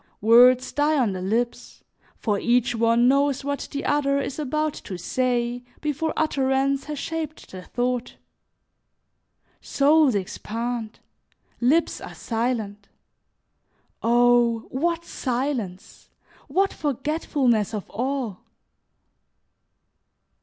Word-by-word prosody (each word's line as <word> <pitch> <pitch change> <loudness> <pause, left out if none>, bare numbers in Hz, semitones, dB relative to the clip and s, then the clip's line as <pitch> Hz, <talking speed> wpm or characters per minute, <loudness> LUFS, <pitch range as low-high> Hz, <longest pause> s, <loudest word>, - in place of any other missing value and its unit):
Words 245 +4 +6
die 295 +1 +2
on 240 -7 +2
the 185 - -5
lips, 230 +6 -2 0.3
for 205 -3 -1
each 245 0 +2
one 230 +1 +3
knows 280 +1 +2
what 285 0 -3
the 280 - -4
other 280 -1 +2
is 280 +1 -4
about 305 +1 -1
to 185 - -5
say 245 +5 -1 0.2
before 300 +2 -1
utterance 275 -2 +1
has 300 0 -5
shaped 315 0 -5
the 185 - -8
thought. 245 +4 -2 1.5
Souls 290 -3 +3
expand, 225 +4 -4 0.6
lips 290 +8 +2
are - - -9
silent. 225 -4 -3 1.1
Oh! 240 0 +4
what 335 +5 -1
silence! 245 - -4 0.4
What 390 +1 +1
forgetfulness 275 - 0
of 205 - -5
all! 245 -3 -2
250 Hz, 100 wpm, -24 LUFS, 230-285 Hz, 1.5 s, Words